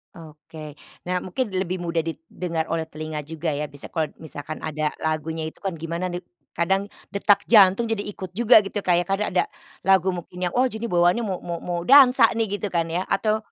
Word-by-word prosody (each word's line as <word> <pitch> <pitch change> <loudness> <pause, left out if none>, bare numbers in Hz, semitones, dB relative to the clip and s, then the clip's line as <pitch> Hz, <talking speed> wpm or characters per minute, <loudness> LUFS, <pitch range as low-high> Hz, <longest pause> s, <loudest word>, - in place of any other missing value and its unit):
Oke. 155 -1 -11 0.3
Nah, 180 0 -1
mungkin 205 +3 -3
lebih 185 0 -1
mudah 170 -1 0
didengar 165 +1 -4
oleh 165 0 -1
telinga 155 0 -5
juga, 160 +1 -3
ya. 150 +1 -3
Bisa 145 0 -11
kalau 160 -3 0
misalkan 155 0 -7
ada 155 0 -1
lagunya 160 0 -2
itu 155 - -9
kan, 190 -4 -3
gimana 170 +3 -3
nih, 175 0 -6 0.3
kadang 195 +4 +1 0.2
detak 200 0 +3
jantung 205 0 +6
jadi 225 -2 -1
ikut 185 -3 -8
juga, 235 +4 +6
gitu. 205 +1 -3
Kayak, 175 -2 +2
kan 195 +3 -1
ada - - +1 0.4
lagu 190 -1 +4
mungkin 180 -1 -6
yang, - - -14
wah, 255 - +4
jadi 230 -2 -3
bawaannya 175 +4 +3
mau 195 -5 -2
mau 170 -1 -4
mau 175 -1 -3
dansa 270 0 +8
nih, 220 -3 -1
gitu 205 - -3
kan 165 -1 0
ya, 175 +3 -1
atau 215 +2 +1
175 Hz, 195 wpm, -24 LUFS, 160-200 Hz, 0.4 s, dansa